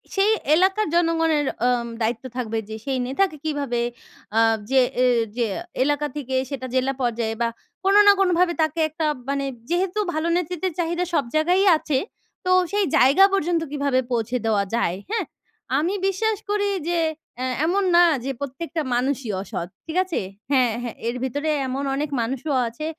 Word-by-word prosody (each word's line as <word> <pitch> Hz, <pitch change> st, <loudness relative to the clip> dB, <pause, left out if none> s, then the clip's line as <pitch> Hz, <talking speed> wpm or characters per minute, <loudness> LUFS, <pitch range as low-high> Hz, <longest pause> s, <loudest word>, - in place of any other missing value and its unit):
সেই 400 Hz, +2 st, +4 dB, 0.2 s
এলাকার 385 Hz, +4 st, +2 dB
জনগণের 325 Hz, -3 st, +2 dB, 0.2 s
আম 240 Hz, -1 st, +1 dB
দায়িত্ব 225 Hz, +3 st, -1 dB
থাকবে 225 Hz, -2 st, -2 dB
যে 220 Hz, -, -5 dB
সেই 270 Hz, -2 st, -1 dB
নেতাকে 310 Hz, +3 st, 0 dB
কীভাবে 280 Hz, -6 st, -1 dB, 0.6 s
আ -, -, +6 dB, 0.3 s
যে 265 Hz, -1 st, +5 dB, 0.2 s
এ -, -, +5 dB, 0.3 s
যে 235 Hz, -, +2 dB, 0.4 s
এলাকা 290 Hz, +1 st, 0 dB
থেকেই 260 Hz, -2 st, -1 dB
সেটা 260 Hz, -2 st, -5 dB
জেলা 260 Hz, +1 st, +1 dB
পর্যায়ে 230 Hz, -2 st, -1 dB
বা 235 Hz, -, +3 dB, 0.4 s
কোনো 400 Hz, +1 st, +6 dB
না -, -, +11 dB
কোনো 375 Hz, -2 st, +3 dB
ভাবে 355 Hz, -1 st, +3 dB
তাকে 315 Hz, +1 st, 0 dB
একটা 315 Hz, +1 st, -3 dB, 0.2 s
মানে, 280 Hz, 0 st, 0 dB, 0.2 s
যেহেতু 370 Hz, +4 st, 0 dB
ভালো 315 Hz, +2 st, -1 dB
নেতৃত্বের 360 Hz, 0 st, -2 dB
চাহিদা 345 Hz, +1 st, 0 dB
সব 290 Hz, -, +3 dB
জায়গায়ই 360 Hz, +5 st, +3 dB
আছে, 300 Hz, -3 st, -1 dB, 0.5 s
তো 365 Hz, -, +2 dB, 0.2 s
সেই 410 Hz, -1 st, +2 dB
জায়গা 280 Hz, +10 st, +6 dB
পর্যন্ত 345 Hz, -3 st, +1 dB
কীভাবে 280 Hz, -3 st, +1 dB
পৌঁছে 240 Hz, +1 st, 0 dB
দেওয়া 210 Hz, -3 st, +2 dB
যায়? 185 Hz, -7 st, +1 dB
হ্যাঁ? 450 Hz, -, -1 dB, 0.5 s
আমি 345 Hz, +6 st, 0 dB
বিশ্বাস 425 Hz, +2 st, 0 dB
করি 410 Hz, -1 st, +1 dB, 0.2 s
যে 345 Hz, -, +1 dB, 0.4 s
অ্যা 255 Hz, +1 st, -2 dB, 0.2 s
এমন 385 Hz, +4 st, +1 dB
না 350 Hz, -, +8 dB, 0.2 s
যে 275 Hz, -, -1 dB
প্রত্যেকটা 310 Hz, +4 st, -4 dB
মানুষই 260 Hz, -1 st, -1 dB
অসৎ। 175 Hz, -3 st, -5 dB, 0.2 s
ঠিক 325 Hz, +2 st, -4 dB
আছে? 365 Hz, -3 st, -2 dB, 0.3 s
হ্যাঁ, 255 Hz, -4 st, +4 dB
হ্যাঁ। 240 Hz, -2 st, -5 dB
এর 235 Hz, -, -1 dB
ভিতরেই 290 Hz, +4 st, -1 dB
এমন 270 Hz, +2 st, -3 dB
অনেক 295 Hz, +1 st, -2 dB
মানুষও 265 Hz, +4 st, -2 dB
আছে, 235 Hz, +7 st, -6 dB
295 Hz, 165 wpm, -23 LUFS, 255-350 Hz, 0.6 s, না